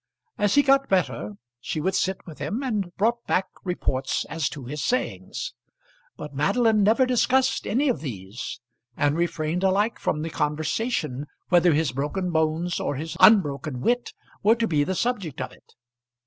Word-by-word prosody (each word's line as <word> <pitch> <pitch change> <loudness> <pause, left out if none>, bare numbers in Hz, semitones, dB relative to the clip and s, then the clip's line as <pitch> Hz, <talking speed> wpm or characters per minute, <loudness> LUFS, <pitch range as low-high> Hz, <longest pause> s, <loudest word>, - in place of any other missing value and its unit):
As 205 -1 +2
he 285 - +6
got 275 0 +3
better 130 - 0 0.3
she 155 - -3
would 190 +5 0
sit 190 0 -1
with 155 -5 -11
him, 180 - -3
and 210 -8 -1
brought 235 +3 +1
back 190 - +2 0.2
reports 135 -7 -1
as 160 -3 -1
to 140 -4 -8
his 145 +2 -4
sayings. 255 - -2 0.6
But 150 - -8
Madeline 215 - +2
never 220 +6 +4
discussed 255 +1 +2
any 275 +6 +1
of 250 - +1
these; 110 -3 -6 0.4
and 145 0 +2
refrained 170 +1 -1
alike 200 +4 +2
from 150 0 -1
the 165 - -4
conversation, 150 - -1 0.2
whether 175 -2 +5
his 155 -4 +1
broken 150 +8 -2
bones 160 +2 0
or - - -2
his 155 +4 -5
unbroken 150 - +4
wit 240 - 0 0.3
were 220 +3 +5
to 230 -1 0
be 150 -6 +2
the 190 +6 -2
subject 200 - -2
of 130 - -4
it. - - -21
175 Hz, 165 wpm, -25 LUFS, 150-220 Hz, 0.6 s, he